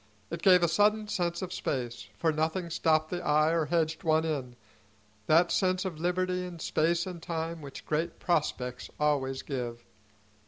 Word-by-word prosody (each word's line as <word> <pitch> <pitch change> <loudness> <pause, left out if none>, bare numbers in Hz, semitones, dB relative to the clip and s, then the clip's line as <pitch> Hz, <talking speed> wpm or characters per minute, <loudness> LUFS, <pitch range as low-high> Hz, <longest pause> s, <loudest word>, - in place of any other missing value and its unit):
It 170 0 -4
gave 180 -2 +6
a - - +5
sudden 210 +5 +3
sense 175 -3 -1
of 185 0 -5
space, 120 -3 -3
for 165 - +2
nothing 160 +3 -1
stopped 155 -1 +2
the 175 -1 -3
eye 155 0 +3
or 165 -2 +1
hedged 160 0 0
one 160 0 +3
in, 135 -6 -3 0.7
that 170 +2 +5
sense 185 0 +1
of 170 -5 -4
liberty 180 +1 0
in 180 -1 -7
space 165 +1 +1
and 180 -3 -7
time 165 0 -4
which 140 -2 -9
great 160 +3 -1
prospects 125 -7 -1
always 135 -3 0
give. 120 -4 -5
165 Hz, 165 wpm, -29 LUFS, 150-175 Hz, 0.7 s, gave